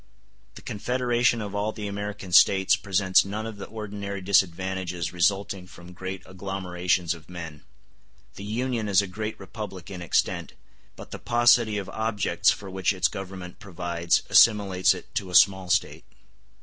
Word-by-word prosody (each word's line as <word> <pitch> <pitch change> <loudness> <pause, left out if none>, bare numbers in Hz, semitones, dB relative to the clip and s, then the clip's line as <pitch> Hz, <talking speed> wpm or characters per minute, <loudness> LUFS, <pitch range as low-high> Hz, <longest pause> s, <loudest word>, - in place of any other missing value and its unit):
The - - -12
confederation 120 +1 0
of 100 -1 -7
all 105 +1 -1
the 105 -1 -6
American 100 -1 -6
States 95 +1 +5
presents 95 -1 +2
none 105 +3 -5
of 110 -2 -7
the 100 - -8
ordinary 100 -2 -6
disadvantages 95 -2 0
resulting 95 +2 0
from 90 0 -13
great 95 +1 -6
agglomerations 90 -2 -2
of 85 -1 -14
men. 85 -4 -8 0.7
The 100 - -10
Union 115 +1 -2
is 100 0 +4
a - - -3
great 110 +4 -5
republic 95 -2 -8
in 90 -2 -7
extent, 85 - -1 0.4
but - - -12
the - - -7
paucity 120 -2 +3
of 100 - -4
objects 110 -2 0
for 100 - -2
which 95 +1 0
its 90 -5 +2
Government 95 0 -8
provides 85 -2 -1
assimilates 100 -5 +5
it - - -12
to 95 - -3
a 90 - -4
small 95 -1 +5
State. 90 - 0
95 Hz, 155 wpm, -25 LUFS, 90-105 Hz, 0.7 s, States